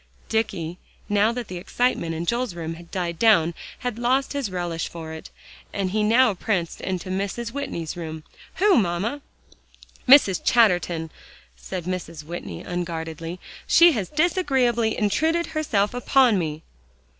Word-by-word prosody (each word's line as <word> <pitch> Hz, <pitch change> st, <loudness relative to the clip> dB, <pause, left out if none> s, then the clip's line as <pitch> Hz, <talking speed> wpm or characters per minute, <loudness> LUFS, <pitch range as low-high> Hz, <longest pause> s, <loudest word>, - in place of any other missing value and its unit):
Dicky, 180 Hz, -6 st, -2 dB, 0.3 s
now 205 Hz, +2 st, +3 dB
that 240 Hz, -2 st, -5 dB
the 180 Hz, -, -6 dB
excitement 175 Hz, -5 st, 0 dB
in 165 Hz, +2 st, -3 dB
Joel's 235 Hz, -1 st, -1 dB
room 165 Hz, -1 st, -4 dB
had 170 Hz, +1 st, -12 dB
died 170 Hz, -3 st, -3 dB
down, 170 Hz, -7 st, +4 dB, 0.3 s
had 245 Hz, -2 st, -3 dB
lost 260 Hz, +4 st, +1 dB
his 280 Hz, -6 st, -2 dB
relish 175 Hz, -3 st, -3 dB
for 160 Hz, -1 st, -8 dB
it, 160 Hz, -, -9 dB, 0.4 s
and 195 Hz, -2 st, -2 dB
he 215 Hz, +2 st, +1 dB
now 230 Hz, +2 st, +4 dB
pranced 180 Hz, -3 st, -2 dB
into 185 Hz, 0 st, -3 dB
Mrs. 200 Hz, +5 st, -3 dB
Whitney's 170 Hz, -, -4 dB
room. 160 Hz, -2 st, -6 dB, 0.3 s
"Who, 400 Hz, -2 st, +4 dB
mamma?" 200 Hz, +9 st, -1 dB, 0.9 s
"Mrs. 250 Hz, -9 st, +7 dB
Chatterton," 180 Hz, -8 st, +2 dB, 0.4 s
said 185 Hz, -2 st, -6 dB
Mrs. 170 Hz, -3 st, -5 dB
Whitney 150 Hz, -, -7 dB
unguardedly. 165 Hz, -1 st, -4 dB, 0.3 s
"She 345 Hz, 0 st, +7 dB
has 215 Hz, -, -2 dB
disagreeably 265 Hz, -, +1 dB
intruded 320 Hz, +11 st, +1 dB
herself 220 Hz, -10 st, +1 dB
upon 245 Hz, -3 st, +3 dB
me." 155 Hz, -2 st, -4 dB
195 Hz, 140 wpm, -24 LUFS, 170-245 Hz, 0.9 s, Mrs